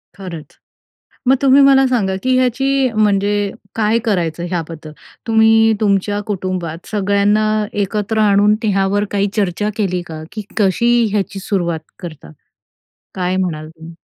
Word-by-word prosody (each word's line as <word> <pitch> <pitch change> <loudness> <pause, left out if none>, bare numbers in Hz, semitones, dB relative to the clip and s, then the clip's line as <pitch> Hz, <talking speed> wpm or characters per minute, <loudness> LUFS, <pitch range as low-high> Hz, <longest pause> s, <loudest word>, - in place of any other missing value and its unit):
खरंच. 180 -6 -9 0.7
मग 265 - +6
तुम्ही 275 +1 +5
मला 270 -1 +5
सांगा, 200 -7 0
की 255 0 +2
ह्याची 265 +1 +1
म्हणजे 205 -1 +1 0.2
काय 225 +1 +1
करायचं, 175 -5 -1
ह्याबद्दल 165 -3 -5 0.4
तुम्ही 225 0 +4
तुमच्या 205 0 +1
कुटुंबात 180 -4 -4
सगळ्यांना 205 +1 +2 0.4
एकत्र 210 +2 -2
आणून 205 0 +4
ह्यावर 200 0 +1
काही 200 0 +1
चर्चा 205 0 -1
केली 185 -4 -1
का, 155 -1 -8
की 215 -1 -6
कशी 225 +4 +2 0.2
ह्याची 200 -1 -2
सुरुवात 175 -5 -2 0.2
करता? 155 - -9 0.8
काय 185 0 -1
म्हणाल 155 -5 -3
तुम्ही? 165 +1 -13
200 Hz, 130 wpm, -17 LUFS, 180-220 Hz, 0.8 s, मग